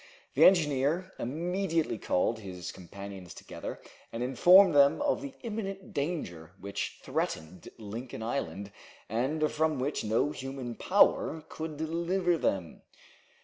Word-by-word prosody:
The -, -, +6 dB
engineer 160 Hz, +1 st, +3 dB
immediately 165 Hz, -, -1 dB
called 110 Hz, +6 st, 0 dB
his 90 Hz, -4 st, -7 dB
companions 95 Hz, -1 st, -9 dB
together, -, -, -7 dB, 0.3 s
and 115 Hz, +1 st, -3 dB
informed 175 Hz, +8 st, +7 dB
them 140 Hz, -1 st, +5 dB
of 290 Hz, -, +1 dB
the 280 Hz, -2 st, -7 dB
imminent 195 Hz, -4 st, -5 dB
danger 95 Hz, -, -3 dB
which 100 Hz, +1 st, -4 dB
threatened 80 Hz, +3 st, -3 dB
Lincoln 110 Hz, +2 st, -7 dB
Island, 100 Hz, -5 st, -3 dB, 0.4 s
and 145 Hz, +7 st, 0 dB
from 155 Hz, -1 st, +1 dB
which 135 Hz, +3 st, -2 dB
no 110 Hz, +7 st, +1 dB
human 135 Hz, -3 st, -5 dB
power 155 Hz, +6 st, +3 dB
could 155 Hz, -1 st, -6 dB
deliver 170 Hz, +3 st, 0 dB
them. 90 Hz, -5 st, -1 dB
140 Hz, 120 wpm, -30 LUFS, 105-170 Hz, 0.4 s, informed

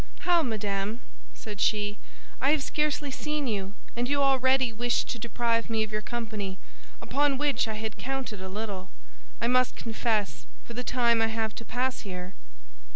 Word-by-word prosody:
"How, 350 Hz, -2 st, +5 dB
madame," 210 Hz, -3 st, -1 dB, 0.4 s
said 210 Hz, -2 st, -6 dB
she, 205 Hz, -1 st, +2 dB, 0.4 s
"I 270 Hz, -, +4 dB
have 295 Hz, -1 st, +3 dB
scarcely 300 Hz, -1 st, 0 dB
seen 300 Hz, +1 st, -2 dB
you, 200 Hz, -4 st, -2 dB, 0.2 s
and 240 Hz, +1 st, 0 dB
you 285 Hz, 0 st, +3 dB
already 260 Hz, -2 st, +4 dB
wish 240 Hz, +2 st, +2 dB
to 240 Hz, -, -4 dB
deprive 235 Hz, 0 st, 0 dB
me 220 Hz, -1 st, +2 dB
of 215 Hz, -, -5 dB
your 215 Hz, 0 st, -1 dB
company, 215 Hz, -4 st, -3 dB, 0.5 s
upon 285 Hz, -1 st, +2 dB
which 290 Hz, -3 st, +2 dB
I 220 Hz, -, -2 dB
had 220 Hz, 0 st, -4 dB
counted 265 Hz, -6 st, -3 dB
a 190 Hz, -, -5 dB
little, 195 Hz, -2 st, -4 dB, 0.5 s
I -, -, 0 dB
must 255 Hz, 0 st, +3 dB
confess, 215 Hz, -, -1 dB, 0.2 s
for 235 Hz, -, -8 dB
the 250 Hz, +2 st, -3 dB
time 235 Hz, -2 st, +3 dB
I 225 Hz, -, +4 dB
have 220 Hz, -1 st, -1 dB
to 230 Hz, -, -8 dB
pass 250 Hz, +3 st, 0 dB
here?" 185 Hz, -1 st, -6 dB
230 Hz, 170 wpm, -29 LUFS, 210-260 Hz, 0.5 s, How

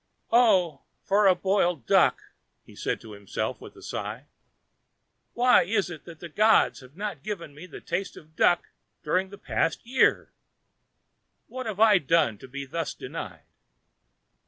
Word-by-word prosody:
"Oh, 190 Hz, -, +4 dB, 0.2 s
for 200 Hz, +1 st, +3 dB
a 185 Hz, -, +6 dB
boiled 180 Hz, -, 0 dB
duck!" -, -, +3 dB, 0.4 s
he -, -, -16 dB
said -, -, -2 dB
to 110 Hz, -, -12 dB
himself 100 Hz, -1 st, -4 dB
with -, -, -12 dB
a -, -, -15 dB
sigh. -, -, -5 dB, 1.1 s
"Why 250 Hz, +1 st, +5 dB
is 200 Hz, -2 st, -1 dB
it 155 Hz, -3 st, -10 dB
that 165 Hz, -2 st, -12 dB
the 170 Hz, -, -8 dB
gods 215 Hz, +7 st, +3 dB
have 130 Hz, +1 st, -16 dB
not 210 Hz, 0 st, -5 dB
given 185 Hz, -8 st, -6 dB
me 150 Hz, +5 st, -11 dB
a 180 Hz, -, -10 dB
taste 195 Hz, 0 st, -4 dB
of 155 Hz, 0 st, -16 dB
duck 175 Hz, +2 st, +2 dB, 0.3 s
during 190 Hz, +1 st, 0 dB
the 200 Hz, -, -11 dB
past 165 Hz, -2 st, -2 dB
year? 255 Hz, +3 st, +2 dB, 1.1 s
What 255 Hz, -1 st, -7 dB
have 210 Hz, -2 st, -5 dB
I 215 Hz, -3 st, +6 dB
done 145 Hz, -, +1 dB
to -, -, -11 dB
be 140 Hz, +2 st, -6 dB
thus 165 Hz, +4 st, -4 dB
denied?" -, -, -8 dB
180 Hz, 160 wpm, -26 LUFS, 155-210 Hz, 1.1 s, a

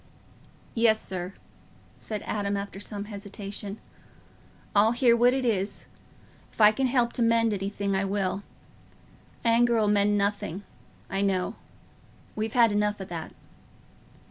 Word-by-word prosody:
"Yes, 225 Hz, -2 st, +3 dB
sir," 185 Hz, -1 st, -4 dB, 0.6 s
said 210 Hz, -2 st, -5 dB
Adam, 200 Hz, -1 st, -1 dB
after 200 Hz, -1 st, -6 dB
some 205 Hz, 0 st, -4 dB
hesitation; 200 Hz, 0 st, -7 dB, 1.0 s
"I'll 215 Hz, +3 st, +5 dB
hear 240 Hz, -1 st, +4 dB
what 240 Hz, +1 st, +5 dB
it 260 Hz, 0 st, -1 dB
is. 205 Hz, -4 st, -1 dB, 0.7 s
If -, -, -22 dB
I 210 Hz, -1 st, +8 dB
can 260 Hz, +5 st, 0 dB
help 245 Hz, -2 st, +1 dB
to -, -, -3 dB
mend 230 Hz, -1 st, +3 dB
anything, 200 Hz, 0 st, -2 dB
I 195 Hz, +1 st, +1 dB
will. 195 Hz, 0 st, -1 dB, 1.0 s
Anger 235 Hz, 0 st, +4 dB
'ull 215 Hz, -2 st, +2 dB
mend 205 Hz, 0 st, +3 dB
nothing, 200 Hz, -2 st, -1 dB, 0.4 s
I 195 Hz, -, -2 dB
know. 190 Hz, -2 st, 0 dB, 0.8 s
We've 215 Hz, 0 st, -2 dB
had 235 Hz, -3 st, +5 dB
enough 210 Hz, 0 st, 0 dB
o' 190 Hz, -, -5 dB
that." 170 Hz, -3 st, -6 dB
205 Hz, 135 wpm, -27 LUFS, 200-230 Hz, 1.0 s, I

